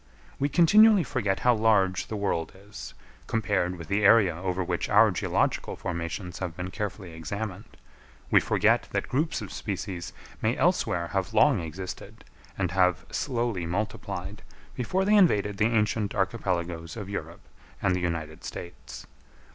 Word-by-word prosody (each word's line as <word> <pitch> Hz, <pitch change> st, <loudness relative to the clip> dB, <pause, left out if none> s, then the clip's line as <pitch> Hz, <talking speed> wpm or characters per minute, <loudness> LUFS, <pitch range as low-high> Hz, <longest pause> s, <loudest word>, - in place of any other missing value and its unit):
We 140 Hz, -, +1 dB
continually 205 Hz, +5 st, +6 dB
forget 105 Hz, -11 st, -1 dB
how 125 Hz, -, +5 dB
large 105 Hz, -5 st, +2 dB
the 110 Hz, -, -4 dB
world 100 Hz, -5 st, -2 dB
is, 100 Hz, +2 st, -10 dB, 0.3 s
compared 100 Hz, -5 st, 0 dB
with 85 Hz, -2 st, -9 dB
the 100 Hz, +4 st, 0 dB
area 100 Hz, -4 st, +6 dB
over 90 Hz, +1 st, -2 dB
which -, -, -2 dB
our -, -, +6 dB
geological -, -, 0 dB
formations 90 Hz, +2 st, -5 dB
have 90 Hz, -4 st, -4 dB
been 90 Hz, +1 st, -5 dB
carefully 100 Hz, -2 st, -5 dB
examined; 95 Hz, +5 st, -5 dB, 0.7 s
we -, -, +7 dB
forget -, -, +2 dB
that -, -, -1 dB
groups 155 Hz, +5 st, -1 dB
of -, -, -8 dB
species 95 Hz, -3 st, -5 dB, 0.3 s
may 110 Hz, +3 st, +1 dB
elsewhere 90 Hz, -, +1 dB
have 95 Hz, +4 st, -2 dB
long 135 Hz, 0 st, +5 dB
existed, 90 Hz, +3 st, -7 dB, 0.3 s
and 95 Hz, -3 st, -1 dB
have 90 Hz, -1 st, +2 dB
slowly 115 Hz, -8 st, -1 dB
multiplied, 105 Hz, +5 st, -4 dB, 0.3 s
before 185 Hz, +11 st, -1 dB
they 210 Hz, -, +3 dB
invaded 105 Hz, -, +4 dB
the 105 Hz, -, +3 dB
ancient 105 Hz, -2 st, +1 dB
archipelagoes 90 Hz, -4 st, -2 dB
of 105 Hz, -3 st, -6 dB
Europe 100 Hz, -, -6 dB, 0.4 s
and 95 Hz, -1 st, +1 dB
the -, -, -1 dB
United 80 Hz, -3 st, -3 dB
States. 85 Hz, -, -8 dB
100 Hz, 145 wpm, -27 LUFS, 90-110 Hz, 0.7 s, we